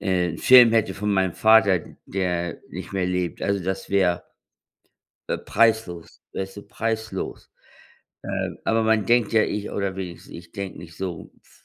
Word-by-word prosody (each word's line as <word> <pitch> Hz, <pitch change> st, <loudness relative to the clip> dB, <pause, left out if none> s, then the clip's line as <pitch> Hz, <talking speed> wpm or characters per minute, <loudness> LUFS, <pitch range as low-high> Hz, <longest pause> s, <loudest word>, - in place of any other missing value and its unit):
äh, 90 Hz, -2 st, +1 dB
'n 80 Hz, -, -7 dB
Film 125 Hz, -3 st, +8 dB
hätte 110 Hz, -1 st, +1 dB
von 105 Hz, +1 st, -1 dB
meinem 95 Hz, -2 st, +1 dB
Vater, 100 Hz, -5 st, +5 dB, 0.3 s
der 90 Hz, -2 st, -2 dB
nicht -, -, -8 dB
mehr 95 Hz, -, 0 dB
lebt, 90 Hz, -2 st, -2 dB
also 100 Hz, -2 st, 0 dB
das 95 Hz, +1 st, -4 dB
wäre, 90 Hz, -3 st, +2 dB, 1.0 s
äh, -, -, -1 dB
preislos, 110 Hz, -6 st, 0 dB
weißt 95 Hz, +1 st, -5 dB
du, -, -, -7 dB
preislos. 110 Hz, -3 st, -4 dB, 0.7 s
Äh, -, -, -3 dB
aber 115 Hz, 0 st, +2 dB
man 110 Hz, -3 st, +2 dB
denkt 120 Hz, -3 st, +3 dB
ja, 110 Hz, -1 st, +5 dB
ich 105 Hz, 0 st, -4 dB
oder 100 Hz, -2 st, -2 dB
wenigstens 90 Hz, -3 st, -8 dB
ich 85 Hz, 0 st, -11 dB
denke 100 Hz, -3 st, -6 dB
nicht 85 Hz, 0 st, -12 dB
so 90 Hz, -4 st, -6 dB
f -, -, -26 dB
95 Hz, 165 wpm, -23 LUFS, 90-110 Hz, 1.0 s, Film